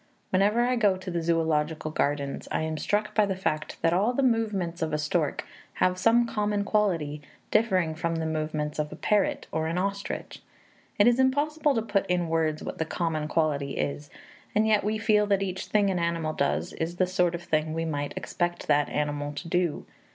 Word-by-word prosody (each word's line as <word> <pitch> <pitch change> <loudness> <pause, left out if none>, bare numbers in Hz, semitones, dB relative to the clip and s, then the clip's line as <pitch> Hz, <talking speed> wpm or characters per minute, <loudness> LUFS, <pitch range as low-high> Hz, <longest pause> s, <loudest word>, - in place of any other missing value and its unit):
Whenever 205 +5 +3
I 250 0 +1
go 205 -5 +3
to 185 0 -6
the 170 - -1
zoölogical 160 -2 0
gardens, 140 -2 -1
I - - 0
am 160 -1 -3
struck 210 +5 0
by 215 -2 +3
the 190 - -1
fact 155 -5 -2
that 165 - +4
all 205 +7 +2
the 275 - +1
movements 210 -8 0
of 160 -1 -1
a - - +2
stork 150 +1 -1 0.3
have 185 0 +2
some 230 +4 +4
common 210 -2 -1
quality, 170 -9 0 0.3
differing 185 -7 +2
from 165 +1 -2
the 165 0 -2
movements 155 -1 -2
of 150 0 -1
a - - -6
parrot 210 -2 +1
or 160 0 -1
an 165 +2 -2
ostrich. 200 +2 -3 0.6
It 205 - +5
is 240 +1 +4
impossible 290 +2 +2
to 225 - 0
put 200 -3 0
in 175 -2 0
words 160 -1 0
what - - -6
the - - +2
common 160 -2 -2
quality 150 -3 0
is, 145 0 -3 0.5
and 215 +1 +4
yet 215 -1 +3
we 215 +2 0
feel 215 -2 +3
that 200 -1 +2
each 190 -1 -4
thing 205 -2 +2
an 180 - -1
animal 170 -2 -1
does 75 - -1
is 165 +2 -3
the 185 - +2
sort 180 -1 +1
of 170 - -7
thing 155 -2 0
we 165 0 -1
might 145 -3 -3
expect 175 0 -2
that 145 0 +3
animal 145 0 -2
to 150 +4 -7
do. 175 -2 0
175 Hz, 205 wpm, -27 LUFS, 155-205 Hz, 0.6 s, It